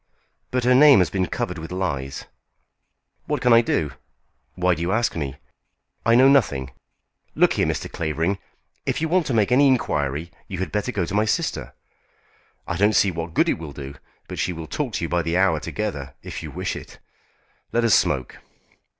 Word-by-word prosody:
"But 125 -1 -1
her 125 +1 +4
name 140 +1 +8
has 90 -3 +2
been 95 -2 0
covered 90 +2 -3
with 80 +2 -8
lies." 70 -8 -3 1.0
"What - - -1
can 125 -1 +4
I 115 - +7
do? 80 -10 -1 0.6
Why 90 0 +2
do 85 - -5
you 85 +2 -1
ask 115 +3 +1
me? 70 -5 -3 0.7
I 115 - +6
know 130 +2 +7
nothing. 70 - +2 0.6
Look - - +4
here, - - +1
Mr. - - -2
Clavering, 80 +4 -2 0.5
if - - 0
you 160 - 0
want 175 0 +1
to 130 - 0
make 110 +1 +2
any 140 +3 +6
inquiry 80 - 0 0.2
you 95 - -5
had 95 - -3
better 105 +4 -1
go 95 -7 -1
to 90 - -6
my 105 +1 +2
sister. 105 - -2 0.9
I 90 - -2
don't 105 +3 +3
see 100 - +4
what 85 -1 -6
good - - +3
it - - 0
will 80 -3 -7
do, 70 -1 -7 0.3
but - - -6
she 90 - 0
will 80 -1 -7
talk 75 - -3
to - - -1
you - - -3
by 85 0 0
the 85 +1 -1
hour 95 -4 +3
together, 70 -5 -4
if - - -6
you 80 - -7
wish 90 +5 -3
it. - - -10 0.7
Let 120 - +1
us 115 - +4
smoke." 65 -2 +1
90 Hz, 200 wpm, -23 LUFS, 80-115 Hz, 1.0 s, name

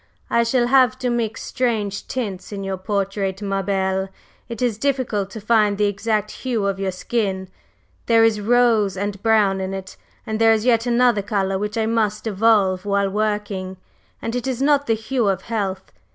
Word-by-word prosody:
"I 235 - +4
shall 240 +1 +2
have 255 0 +4
to 250 -1 -1
mix 225 -2 -2
strange 215 -5 -2
tints 205 -8 -4
in 200 -1 -5
your 195 -1 -3
portrait, 195 0 -2
ma 195 -1 -1
belle! 190 0 -1 0.4
It 230 -2 -6
is 235 -4 0
difficult 250 -8 -1
to 220 - -8
find 210 -1 +2
the 210 - +2
exact 210 +1 -1
hue 235 -6 -2
of 195 -1 -1
your 195 -1 -1
skin 190 -1 -2 0.6
there 230 -1 +5
is 220 -2 +2
rose 225 -3 +3
and 200 0 -3
brown 210 -4 +3
in 190 +1 -3
it; 190 0 -8 0.3
and 220 -1 -3
there 225 0 +6
is 220 +1 -1
yet 235 -1 +3
another 240 -3 +3
color 195 -1 -1
which 210 +2 -3
I 220 - +1
must 220 -2 0
evolve 200 -3 +2
while 200 -1 0
working, 205 -3 -2 0.5
and 230 +1 -3
it 245 +1 -2
is 255 -2 -2
not 285 +1 +2
the 225 - +3
hue 225 +1 -1
of 190 -1 0
health. 195 -4 -3
210 Hz, 185 wpm, -21 LUFS, 195-230 Hz, 0.6 s, there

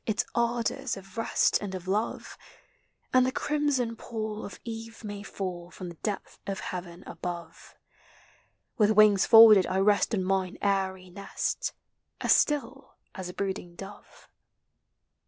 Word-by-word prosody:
Its 215 -2 0
ardors 235 +1 -1
of 195 -1 -13
rest 225 - +2
and 195 -2 -5
of 185 0 -8
love. 205 +4 -2 0.8
And 255 0 +6
the 255 - +1
crimson 285 -5 0
pall 220 -2 -5
of 195 - -8
eve 225 0 -8
may 205 -1 -6
fall 180 -4 -6
From 180 0 -8
the 170 - -10
depth 210 -2 -4
of 195 -1 -3
heaven 175 -1 -6
above. 170 -2 -7 1.0
With 210 -1 +5
wings 215 -2 +5
folded 220 -5 +9
I 185 - -1
rest 205 +3 +3
on 190 - -1
mine 190 -1 -1
airy 190 -2 -1
nest, 200 +2 -3 0.5
As - - +4
still 275 -2 0 0.2
as 185 -2 -6
a - - -7
brooding 190 -3 -4
dove. 195 +3 -12
200 Hz, 140 wpm, -28 LUFS, 185-225 Hz, 1.0 s, folded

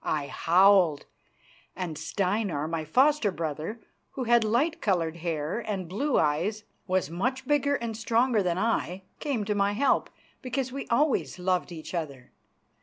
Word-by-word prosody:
I 145 -2 -1
howled, 180 -3 +4 0.7
and 175 -4 -4
Steinar, 185 -4 -1
my 160 -1 -3
foster 265 - +3
brother, 165 +4 -4 0.3
who 265 - -3
had 235 -1 +4
light 250 +10 +1
coloured 170 -5 0
hair 165 +2 -2
and 200 -6 -4
blue 250 - 0
eyes, 165 +8 +1
and - - -37 0.2
was 185 -4 0
much 255 +10 -2
bigger 285 -1 +2
and 235 -4 -4
stronger 230 +1 +2
than 180 -2 0
I, 195 -3 -1 0.2
came 265 -9 -2
to 210 - 0
my 200 0 +1
help, 275 +7 +2 0.3
because 255 0 -2
we 275 +1 -5
always 280 -1 +1
loved 180 0 0
each 160 0 -8
other. 140 -7 -5
200 Hz, 155 wpm, -27 LUFS, 170-235 Hz, 0.7 s, howled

